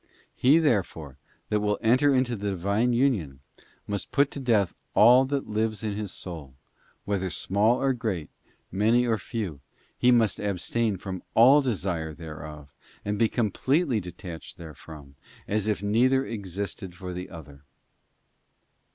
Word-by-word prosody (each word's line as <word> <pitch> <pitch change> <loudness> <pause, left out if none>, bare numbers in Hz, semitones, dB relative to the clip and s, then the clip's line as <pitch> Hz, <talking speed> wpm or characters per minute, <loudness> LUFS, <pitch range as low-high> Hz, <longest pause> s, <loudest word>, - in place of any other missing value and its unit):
* - - -34
He, 135 +5 +4
therefore, 90 - 0 0.3
that 105 - +1
will 105 -1 0
enter 125 +5 +4
into 130 -2 +1
the 100 -1 -3
Divine 100 +6 0
union 110 - 0 0.4
must 100 -1 -4
put 140 -1 +2
to - - -6
death 110 -8 +2 0.2
all 125 +2 +7
that 140 0 -2
lives 110 0 -1
in 105 -2 -2
his 105 -1 -5
soul, 80 -8 -8 0.5
whether 95 -2 -1
small 105 +7 +1
or 135 -1 +2
great, 110 -10 -3 0.4
many 110 +6 +3
or 115 -3 +1
few; 95 - -5 0.3
he 125 - +3
must 115 -4 +3
abstain 105 +2 -1
from 95 0 -6
all 130 +6 +7
desire 90 - -2
thereof, 75 -3 -9 0.3
and 105 0 -2
be 115 - +3
com 110 -4 0
pletely 135 - +1
detached 90 -2 -8
therefrom, 75 -3 -12 0.3
as 105 0 -1
if 105 -1 -1
neither 130 +6 +3
existed 100 -3 -5
for 90 +1 -7
the 90 +1 -6
other. 75 -5 -12
105 Hz, 150 wpm, -26 LUFS, 90-120 Hz, 0.5 s, all